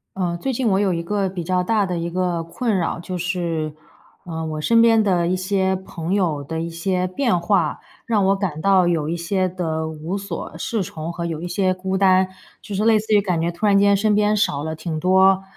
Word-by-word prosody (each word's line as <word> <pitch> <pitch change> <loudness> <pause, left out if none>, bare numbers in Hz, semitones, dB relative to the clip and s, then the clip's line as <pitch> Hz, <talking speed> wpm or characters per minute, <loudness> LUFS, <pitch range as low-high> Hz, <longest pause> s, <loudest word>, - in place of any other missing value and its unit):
呃， 175 -2 -1
最 265 +9 -2
近 255 0 0
我 190 -1 +2
有 200 -3 +2
一 170 - -2
个 195 +3 -1
比 185 -2 -5
较 180 +1 0
大 210 +1 +1
的 180 -1 -2
一 170 0 -2
个 175 -1 -1
困 205 +6 -1
扰， 170 -1 -1
就 180 +1 -5
是， 170 -3 -2 0.5
呃， 160 -2 -4
我 155 -1 -4
身 230 +9 +3
边 230 -1 +5
的 180 -4 +1
一 180 - +1
些 190 0 0
朋 180 -2 -5
友 165 -8 0
的 160 +3 -4
一 165 - -3
些 180 +2 -1
变 200 0 0
化。 170 -3 +1 0.3
让 215 -4 +1
我 195 +1 +3
感 175 -6 -3
到 190 -1 +4
有 160 -3 0
一 170 - -1
些 185 +2 0
的 160 -3 -3
无 160 +4 -4
所 200 +1 -6
适 220 -4 -2
从 165 -1 -6
和 170 0 -5
有 165 -2 -4
一 175 - -4
些 185 +1 +1
孤 190 +1 -3
单。 190 -1 +4 0.3
就 205 - -6
是 210 +3 0
类 220 -1 +5
似 215 +1 -6
于 205 - +5
感 180 -5 -1
觉 170 - 0
突 170 +5 -4
然 200 -1 +5
间 200 0 +5
身 210 +1 +2
边 210 0 +2
少 145 -8 0
了 160 0 -3
挺 160 0 -4
多， 190 +2 +4
185 Hz, 250 characters per minute, -21 LUFS, 170-200 Hz, 0.5 s, 边